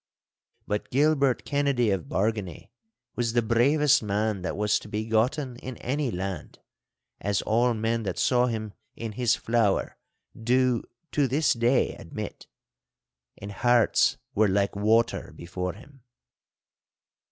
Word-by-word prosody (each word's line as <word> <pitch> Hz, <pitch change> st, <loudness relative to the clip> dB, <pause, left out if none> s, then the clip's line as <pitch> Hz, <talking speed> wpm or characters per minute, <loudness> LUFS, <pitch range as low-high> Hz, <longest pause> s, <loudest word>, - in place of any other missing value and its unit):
But 105 Hz, 0 st, -3 dB
Gilbert 140 Hz, -1 st, +2 dB
Kennedy 140 Hz, -6 st, +1 dB
of 95 Hz, -6 st, -1 dB
Bargany 100 Hz, +1 st, -2 dB, 0.4 s
was 115 Hz, -2 st, -1 dB
the 120 Hz, -1 st, +2 dB
bravest 140 Hz, +6 st, +3 dB
man 105 Hz, -1 st, -1 dB
that 95 Hz, -, -4 dB
was 105 Hz, 0 st, +2 dB
to -, -, -12 dB
be 105 Hz, +1 st, -3 dB
gotten 125 Hz, +4 st, 0 dB
in 130 Hz, 0 st, -8 dB
any 140 Hz, +1 st, -2 dB
land, 95 Hz, -4 st, -5 dB, 0.6 s
as 100 Hz, -1 st, -1 dB
all 120 Hz, +2 st, +2 dB
men 115 Hz, +1 st, -1 dB
that 95 Hz, -5 st, -4 dB
saw 125 Hz, -1 st, +3 dB
him 110 Hz, -3 st, -4 dB, 0.2 s
in 115 Hz, -1 st, -5 dB
his 120 Hz, +2 st, +1 dB
flower 115 Hz, -4 st, 0 dB, 0.4 s
do 125 Hz, +1 st, +2 dB, 0.3 s
to 145 Hz, -2 st, +2 dB
this 145 Hz, +5 st, +2 dB
day 120 Hz, +2 st, +2 dB
admit. -, -, -8 dB, 0.9 s
And 100 Hz, +1 st, -8 dB
hearts 120 Hz, +2 st, +3 dB, 0.2 s
were 110 Hz, +1 st, +3 dB
like 100 Hz, +1 st, +1 dB
water 110 Hz, +3 st, +1 dB
before 90 Hz, +1 st, -4 dB
him. 135 Hz, +6 st, -16 dB
115 Hz, 130 wpm, -26 LUFS, 105-125 Hz, 0.9 s, bravest